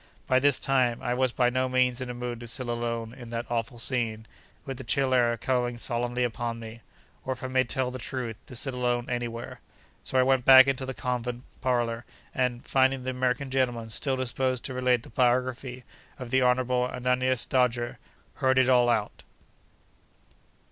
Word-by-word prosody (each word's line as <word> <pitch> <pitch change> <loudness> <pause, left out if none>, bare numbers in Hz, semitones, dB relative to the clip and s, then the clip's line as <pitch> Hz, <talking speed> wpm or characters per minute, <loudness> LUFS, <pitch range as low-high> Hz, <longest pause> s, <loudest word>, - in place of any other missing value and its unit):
By 130 - +3
this 140 0 +4
time, 130 -4 +1
I 120 - 0
was 130 0 +1
by 125 0 +2
no 130 +1 0
means 125 0 +1
in 130 - -4
a 125 - -5
mood 120 -1 -4
to 120 - -8
sit 125 +2 -2
alone 115 -1 -3
in 120 -2 -10
that 115 +1 -3
awful 120 0 -2
scene, 115 -3 -1 0.4
with 135 -2 -5
the - - -6
chill 130 +2 +1
air 120 -2 +3
coming 120 0 -1
solemnly 120 +1 -1
upon 120 -1 -2
me—or, 115 +3 -9
if 130 - -12
I - - -2
may 130 0 +2
tell 125 +1 -1
the 130 - -6
truth, 120 -2 -4
to 130 - -9
sit 130 +2 -1
alone 125 -1 -1
anywhere. 120 -1 -4 0.4
So 130 - -2
I 130 - +6
went 130 -1 +2
back 130 0 +9
into 135 -1 -1
the 130 - -5
convent 125 -1 -3 0.2
parlour, 120 -2 0 0.3
and, 125 -2 -1
finding 130 -1 +2
the 130 - -2
American 130 +1 -1
gentleman 120 -4 -1
still 135 +3 -1
disposed 130 0 -1
to 130 - -3
relate 125 -2 +1
the - - -13
biography 125 +1 0 0.3
of 125 -3 -8
the 130 - +3
Honourable 125 0 +2
Ananias 125 0 0
Dodger, 120 -2 0 0.4
heard 130 -1 +2
it 130 0 +4
all 120 -1 +5
out. 110 -3 -1
125 Hz, 185 wpm, -27 LUFS, 120-130 Hz, 0.4 s, back